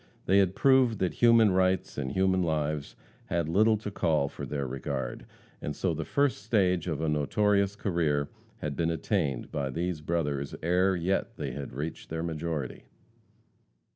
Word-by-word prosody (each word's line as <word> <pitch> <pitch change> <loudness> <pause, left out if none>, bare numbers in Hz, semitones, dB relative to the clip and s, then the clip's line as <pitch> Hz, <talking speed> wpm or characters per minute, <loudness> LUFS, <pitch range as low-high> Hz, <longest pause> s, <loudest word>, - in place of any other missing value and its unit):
They 95 +2 +4
had 95 -1 +2
proved 130 -4 +4
that 95 -2 0
human 115 -3 +5
rights 95 0 +1
and 65 -3 -3
human 95 0 +2
lives 75 -3 -1 0.3
had 85 -2 -1
little 110 +6 +4
to 105 -1 -6
call 80 -7 +1
for - - -7
their 70 -2 -2
regard, 65 -1 -4 0.3
and 75 - -4
so 90 -3 0
the 80 +1 -3
first 140 -6 +1
stage 95 -5 +1
of 80 -3 -2
a 80 - 0
notorious 100 +7 +2
career 80 -8 0 0.3
had 75 -1 -3
been 85 -1 0
attained 80 - -1
by 70 -3 -2
these 85 +3 -2
brothers 75 -4 -2
ere 90 +3 +3
yet 90 +3 -1
they - - -3
had 70 -3 -6
reached 75 +5 -5
their 80 0 -3
majority. 80 -4 -4
85 Hz, 165 wpm, -29 LUFS, 75-95 Hz, 0.3 s, human